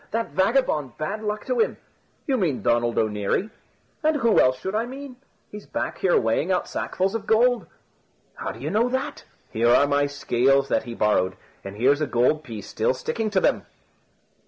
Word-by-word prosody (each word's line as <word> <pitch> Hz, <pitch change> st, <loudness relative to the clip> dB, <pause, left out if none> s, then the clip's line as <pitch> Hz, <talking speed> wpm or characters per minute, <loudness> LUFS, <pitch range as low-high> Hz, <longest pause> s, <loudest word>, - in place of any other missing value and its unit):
That 230 Hz, +1 st, -2 dB
vagabond, 190 Hz, -, +1 dB
bad 200 Hz, +8 st, -3 dB
luck 210 Hz, 0 st, -3 dB
to -, -, -1 dB
him 450 Hz, -, +1 dB, 0.2 s
" -, -, -41 dB
"You 270 Hz, -, +1 dB
mean 175 Hz, -, -1 dB
Donald 120 Hz, 0 st, +1 dB
O'Neary?" 110 Hz, -, 0 dB, 0.5 s
"And 310 Hz, 0 st, +2 dB
who 235 Hz, -6 st, +3 dB
else 130 Hz, 0 st, +4 dB
should 190 Hz, +8 st, -4 dB
I 225 Hz, +2 st, 0 dB
mean? 265 Hz, 0 st, -9 dB, 0.3 s
He's 210 Hz, 0 st, -10 dB
back -, -, -4 dB
here 185 Hz, -, +3 dB
weighing 115 Hz, +10 st, 0 dB
out 180 Hz, -, 0 dB
sackfuls 190 Hz, +1 st, -2 dB
of 225 Hz, -2 st, -4 dB
gold." 230 Hz, -4 st, +3 dB, 0.7 s
"How -, -, -5 dB
do 110 Hz, -, -11 dB
you 145 Hz, +5 st, -4 dB
know 225 Hz, +5 st, +2 dB
that?" 260 Hz, +2 st, -3 dB, 0.3 s
"Here 115 Hz, +2 st, +2 dB
are 130 Hz, +4 st, +5 dB
my 145 Hz, 0 st, +2 dB
scales 135 Hz, -1 st, +1 dB
that -, -, +1 dB
he 120 Hz, -1 st, -7 dB
borrowed, 95 Hz, -4 st, +1 dB, 0.3 s
and 100 Hz, 0 st, -8 dB
here's 140 Hz, +6 st, +3 dB
a 155 Hz, -, +1 dB
gold 130 Hz, +6 st, +2 dB
piece 110 Hz, -8 st, -8 dB
still 110 Hz, +4 st, 0 dB
sticking 220 Hz, -, -2 dB
to 200 Hz, -2 st, +2 dB
them." -, -, +1 dB
155 Hz, 190 wpm, -24 LUFS, -, 0.7 s, are